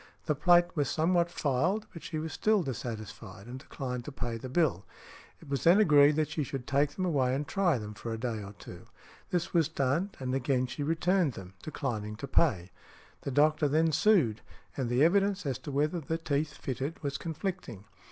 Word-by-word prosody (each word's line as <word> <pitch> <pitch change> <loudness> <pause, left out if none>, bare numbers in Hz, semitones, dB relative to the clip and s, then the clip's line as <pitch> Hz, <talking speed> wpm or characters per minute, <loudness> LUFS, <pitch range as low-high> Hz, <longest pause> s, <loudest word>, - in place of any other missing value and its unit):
The 155 - +2
plate 175 +3 +5
was 145 -3 0
somewhat 170 +2 +2
filed, 170 +8 0
but 165 - -9
she 160 - -5
was 155 0 -4
still 215 -3 +2
dissatisfied, 110 -5 -6
and 125 +2 -8
declined 125 -3 -5
to - - -6
pay 120 -4 -4
the 130 +3 -7
bill. 130 - +1 0.6
It - - -15
was 140 -1 -2
then 175 +5 +6
agreed 150 -6 +6
that 155 -1 0
she 160 - -2
should 135 -2 -5
take 140 +2 +2
them 185 - -1
away 135 -7 +1
and 145 +2 -3
try 185 -7 +2
them 105 -2 -6
for 115 +3 -6
a 115 - -3
day 115 -2 -3
or 100 0 -8
two; - - -12 0.4
this 175 0 -1
was 165 -4 +3
done, 140 +9 0
and 130 -1 -3
again 130 -1 +1
she 130 - -6
returned 165 +1 +1
them, 95 -3 -10
declining 110 -8 -4
to 140 +6 -7
pay. 95 - +2 0.5
The - - -4
doctor 150 +2 +3
then 160 +3 +2
sued, 155 - +3 0.3
and 130 -4 -2
the 125 +4 +3
evidence 195 +2 +2
as 135 -3 -2
to 145 - -7
whether 150 +5 0
the 160 +1 -3
teeth 150 -2 -1
fitted 135 +5 -4
was 140 -1 -2
conflicting. 160 - -5
145 Hz, 200 wpm, -30 LUFS, 125-165 Hz, 0.6 s, then